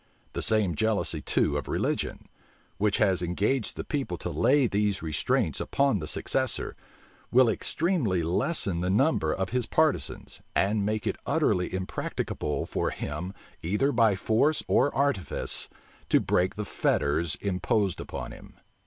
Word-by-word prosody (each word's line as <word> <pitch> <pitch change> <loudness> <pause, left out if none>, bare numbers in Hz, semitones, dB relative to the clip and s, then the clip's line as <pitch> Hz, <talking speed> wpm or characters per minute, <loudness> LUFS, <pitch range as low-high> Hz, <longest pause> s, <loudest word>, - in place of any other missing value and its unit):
The - - -3
same 105 -5 +2
jealousy 100 -4 0
too 70 +2 +1
of 70 - -5
religion, - - -2 0.5
which 105 0 +2
has 95 -4 +2
engaged 100 +8 -1
the - - -4
people 135 - -3
to - - -5
lay 140 0 +3
these 105 -4 0
restraints 80 -2 0
upon 140 -7 +1
the 75 - -5
successor, - - -1 0.6
will 125 +1 +6
extremely 115 - 0
lessen 90 - +1
the 90 - -1
number 105 - +2
of 95 +3 -2
his 125 -2 0
partisans, 155 +4 0 0.2
and 100 +1 +2
make 105 +1 -1
it - - -1
utterly 90 -1 +1
impracticable 95 -5 -3
for - - -1
him, 90 +2 -5 0.3
either 105 - +1
by 115 -5 +3
force 120 +10 +1
or 145 - +3
artifice, 140 -10 +1 0.4
to - - +5
break 90 +1 +1
the 105 0 -4
fetters 80 -2 0
imposed 100 +1 -1
upon - - -6
him. - - -13
100 Hz, 145 wpm, -27 LUFS, 90-125 Hz, 0.6 s, will